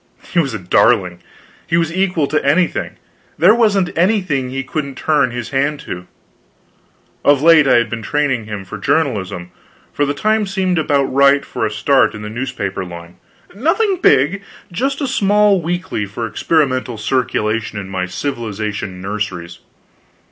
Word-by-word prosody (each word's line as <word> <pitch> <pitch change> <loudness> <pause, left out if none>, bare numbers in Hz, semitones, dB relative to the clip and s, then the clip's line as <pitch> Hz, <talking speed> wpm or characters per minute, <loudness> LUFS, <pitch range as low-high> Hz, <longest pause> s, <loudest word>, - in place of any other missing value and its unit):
He 175 - +3
was 135 -8 0
a - - -1
darling; 90 -1 +2 0.5
he 165 - +1
was 165 -1 0
equal 180 -5 +1
to 155 +2 -1
anything; 160 +5 +1 0.4
there 180 +7 +6
wasn't 205 -6 +2
anything 170 - +1
he 135 +1 -3
couldn't 140 0 -4
turn 145 -2 +1
his 120 +1 -6
hand 140 +2 0
to. 90 -1 -7 1.2
Of 145 -1 +4
late 160 -3 +6
I - - +5
had 120 0 +3
been 115 0 -5
training 135 -1 -1
him 105 -2 -6
for 90 - -8
journalism, 95 - -1 0.4
for 145 - 0
the 145 - -1
time 215 +5 +1
seemed 190 -3 0
about 145 -2 +2
right 140 +1 +3
for 110 - -2
a - - -6
start 130 +3 +2
in 105 - -8
the 105 - -6
newspaper 115 -6 -4
line; 85 -1 -10 0.4
nothing 345 - +1
big, 150 - +3 0.3
but 175 - -14
just 270 - -1
a 280 - 0
small 205 -4 +3
weekly 175 - -3
for 115 +4 -5
experimental 130 -3 0
circulation 110 -2 -1
in 95 - -7
my 95 -1 -3
civilization 105 -4 -4
nurseries. 95 -4 -5
135 Hz, 160 wpm, -17 LUFS, 105-170 Hz, 1.2 s, there